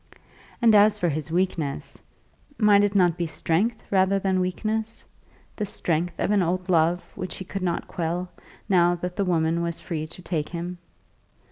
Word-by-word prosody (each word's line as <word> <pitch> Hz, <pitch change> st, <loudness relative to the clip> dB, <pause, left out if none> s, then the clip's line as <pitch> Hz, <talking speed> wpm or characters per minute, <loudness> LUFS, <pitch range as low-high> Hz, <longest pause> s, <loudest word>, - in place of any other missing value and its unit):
And 225 Hz, -2 st, +6 dB
as 210 Hz, 0 st, +6 dB
for 175 Hz, -4 st, +1 dB
his 155 Hz, 0 st, -3 dB
weakness; 165 Hz, -5 st, -2 dB, 0.6 s
might 205 Hz, -2 st, +5 dB
it 205 Hz, 0 st, 0 dB
not 175 Hz, -3 st, +4 dB
be 170 Hz, -, -1 dB
strength, 170 Hz, +8 st, -1 dB
rather 190 Hz, 0 st, +3 dB
than 190 Hz, -1 st, +1 dB
weakness; 215 Hz, +5 st, -2 dB, 0.5 s
the 215 Hz, -, -3 dB
strength 175 Hz, -3 st, -1 dB
of -, -, +1 dB
an 205 Hz, -2 st, +3 dB
old 180 Hz, +2 st, -1 dB
love 170 Hz, +1 st, +3 dB
which 185 Hz, -2 st, -6 dB
he 190 Hz, -, -7 dB
could 195 Hz, +2 st, -5 dB
not 175 Hz, -2 st, -2 dB
quell, 175 Hz, +2 st, -3 dB, 0.4 s
now 175 Hz, -2 st, +4 dB
that 180 Hz, +1 st, -5 dB
the 200 Hz, -, 0 dB
woman 165 Hz, -1 st, +1 dB
was 170 Hz, -1 st, -2 dB
free 155 Hz, -2 st, -4 dB
to 165 Hz, +3 st, -11 dB
take 155 Hz, -5 st, -2 dB
him? 175 Hz, +1 st, -5 dB
180 Hz, 170 wpm, -25 LUFS, 170-195 Hz, 0.6 s, And